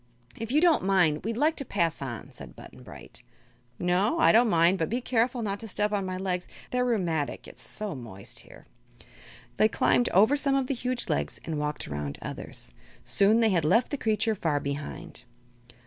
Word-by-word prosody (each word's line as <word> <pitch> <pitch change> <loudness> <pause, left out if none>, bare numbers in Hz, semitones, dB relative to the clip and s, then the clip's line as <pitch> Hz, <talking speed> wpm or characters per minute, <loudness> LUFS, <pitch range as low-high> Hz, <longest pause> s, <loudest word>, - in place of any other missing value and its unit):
"If 225 +1 -5
you 300 +3 +3
don't 340 - +4
mind, 180 -6 +2
we'd 225 +2 -3
like 310 +4 +2
to 275 - -2
pass 170 - -1
on," 125 -5 -6
said - - -12
Button - - -13
Bright. - - -11 0.6
"No; 185 - +1
I 330 - +5
don't 230 +1 +5
mind; 170 +1 +4
but 160 - 0
be 240 - 0
careful 245 0 0
not 200 -1 -2
to 225 - -7
step 210 +1 -1
on 200 -2 -1
my 185 0 -3
legs. 180 -1 -2 0.2
They're 250 0 +1
rheumatic, 175 - -1
it's - - -12
so 210 -2 -5
moist 115 -8 -8
here." - - -15 0.9
They 215 - +5
climbed 245 +2 +2
over 215 +9 +5
some 280 -1 +2
of 270 -1 +1
the 275 - -1
huge 250 -1 -3
legs - - -2
and 160 -3 -3
walked 150 0 -3
around 75 -1 -4
others. - - -7 0.3
Soon 210 +3 +3
they 225 - +4
had 175 -5 +2
left 230 +11 +3
the - - 0
creature 220 -1 +1
far 160 -7 0
behind. 140 +1 -6
200 Hz, 195 wpm, -27 LUFS, 160-235 Hz, 0.9 s, I